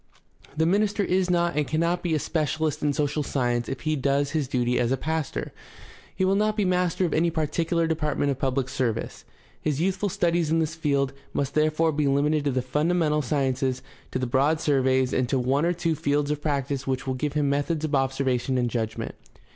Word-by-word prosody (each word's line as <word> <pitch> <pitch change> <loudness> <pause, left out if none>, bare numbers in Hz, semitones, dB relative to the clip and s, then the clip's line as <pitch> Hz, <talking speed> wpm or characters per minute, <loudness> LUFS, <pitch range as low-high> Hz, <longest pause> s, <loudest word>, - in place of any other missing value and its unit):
The 160 - +3
minister 205 +3 +2
is 185 -1 +1
not 170 -2 +1
and 150 -2 0
cannot 170 +3 0
be 170 -3 0
a - - +2
specialist 155 0 -1
in 150 - +2
social 150 +1 0
science 120 -4 -1
if 135 -3 -4
he 155 +3 0
does 140 +1 +1
his 150 -3 -1
duty 125 -2 0
as 120 0 +1
a 135 - +2
pastor. 155 - -3 0.6
He 190 - +1
will 190 - +3
not 215 +2 +1
be 205 - +2
master 180 0 +1
of 170 - -1
any 170 +2 +3
particular 165 +1 0
department 150 -3 0
of 135 - -4
public 135 -1 0
service. 125 -4 -3 0.4
His 150 -2 -1
youth 190 +3 +1
ful 205 - -1
studies 170 -2 +1
in 165 - +2
this 160 -1 0
field 140 -4 0 0.2
must 140 -1 -1
therefore 155 +1 +2
be 150 -1 0
limited 145 +2 +2
to 140 - +2
the 130 -1 -1
funda 150 +7 0
mental 150 -3 +2
sciences, 130 -2 -1 0.3
to - - -2
the 130 - -1
broad 140 +6 +2
surveys, 130 -3 +2
and 125 -1 +1
to 135 - +1
one 135 +5 +1
or 175 - +2
two 170 -1 0
fields 145 -1 0
of 150 -1 -2
practice 140 -2 -2
which 135 0 -1
will 130 - -1
give 140 +3 -2
him 150 -1 +1
methods 145 +3 0
of 155 - -4
observation 135 -1 +1
and 120 -1 0
judgment. 110 -2 -3
150 Hz, 210 wpm, -25 LUFS, 135-160 Hz, 0.6 s, The